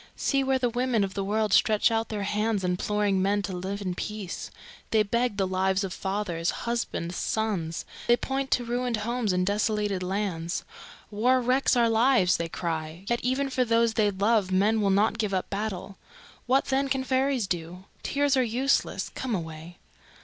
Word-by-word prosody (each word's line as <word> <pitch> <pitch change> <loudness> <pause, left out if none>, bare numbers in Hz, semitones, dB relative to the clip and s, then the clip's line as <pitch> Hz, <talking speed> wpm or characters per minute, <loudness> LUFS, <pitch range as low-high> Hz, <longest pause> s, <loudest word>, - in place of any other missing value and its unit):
See 275 -1 +1
where 265 0 +2
the 250 -1 +1
women 240 -2 +1
of 190 -1 -3
the 200 - -2
world 210 0 0
stretch 215 +1 +4
out 225 0 0
their 210 -2 -3
hands, 210 0 0
imploring 195 +2 0
men 200 +1 +1
to 185 - -4
live 195 +3 -4
in 185 -2 -2
peace. 205 0 -5 0.4
They 220 -1 +3
beg 235 +1 0
the 195 - +2
lives 190 +1 +1
of 190 -2 -4
fathers, 190 -4 -2 0.2
husbands, 230 -7 -2
sons; 190 -8 -2 0.2
they 240 - +5
point 270 +1 -2
to 245 - +2
ruined 245 0 -1
homes 235 -3 0
and 180 0 +1
desolated 205 -1 0
lands. 180 -3 -2 0.5
'War 245 +5 +3
wrecks 255 +2 +2
our 235 -1 +4
lives!' 225 -4 +4
they 170 0 -3
cry. 165 +1 -4
Yet 240 0 +1
even 265 +2 0
for 255 0 +2
those 230 -1 +2
they 215 -2 +3
love 200 0 +1
men 210 +4 +3
will 200 - +2
not 210 +3 +2
give 210 -3 0
up 185 - -3
battle. 200 -1 -4 0.5
What, 265 +2 +3
then, 270 +1 +1
can 265 -1 0
fairies 260 -2 +1
do? 175 0 -4 0.2
Tears 285 -1 +1
are 260 - +3
useless. 250 +4 0
Come 255 -4 -2
away." 165 0 -7
210 Hz, 180 wpm, -27 LUFS, 190-240 Hz, 0.5 s, they